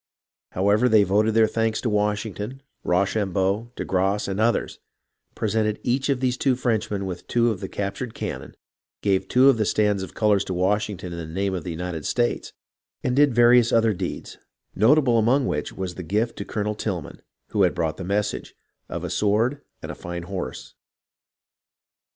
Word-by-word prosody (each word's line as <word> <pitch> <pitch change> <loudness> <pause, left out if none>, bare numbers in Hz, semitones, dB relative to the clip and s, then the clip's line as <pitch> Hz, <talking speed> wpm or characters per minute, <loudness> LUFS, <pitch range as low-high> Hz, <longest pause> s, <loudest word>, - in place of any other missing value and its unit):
However, 105 +6 +3
they 110 -2 +6
voted 105 +3 +2
their 115 -1 +6
thanks 110 0 0
to 120 - -1
Washington, 105 +4 -2 0.2
Rocham 95 +1 +1
beau, 100 +5 0
de - - -4
Grasse 95 +2 0
and 100 +1 -3
others; 115 +2 0 0.6
presented 110 0 0
each 130 +3 0
of 135 -2 +1
these 125 -1 +1
two 130 -1 +2
Frenchmen 110 -5 -1
with 90 -2 -6
two 120 -1 +2
of 100 - -4
the 95 - -6
captured 105 +4 -4
cannon; - - -6 0.5
gave 95 -2 +1
two 130 +5 +5
of 135 -4 +6
the 110 - +2
stands 105 -1 +1
of 95 - -8
colours 105 -2 +3
to 95 - -3
Washington 95 -1 -1
in 85 - -5
the 85 - -5
name 95 +4 -2
of 90 -4 -3
the - - -5
United 85 -2 -4
States, 120 -1 0 0.5
and 125 - 0
did 145 -3 +4
various 120 0 +6
other 115 -1 +3
deeds, 90 - -6 0.3
notable 120 +2 +4
among 125 +5 +3
which - - -2
was 95 -2 -5
the 90 - -7
gift 105 +7 -1
to - - -5
Colonel 105 -1 -2
Tilghman, 95 -7 -4 0.3
who - - 0
had - - +3
brought 80 -1 -1
the 95 - -6
message, 100 +3 -2 0.3
of - - -5
a - - -3
sword 115 +7 +1 0.2
and - - -5
a - - -5
fine 85 0 -6
horse. 95 +1 -6
105 Hz, 180 wpm, -24 LUFS, 95-115 Hz, 0.6 s, they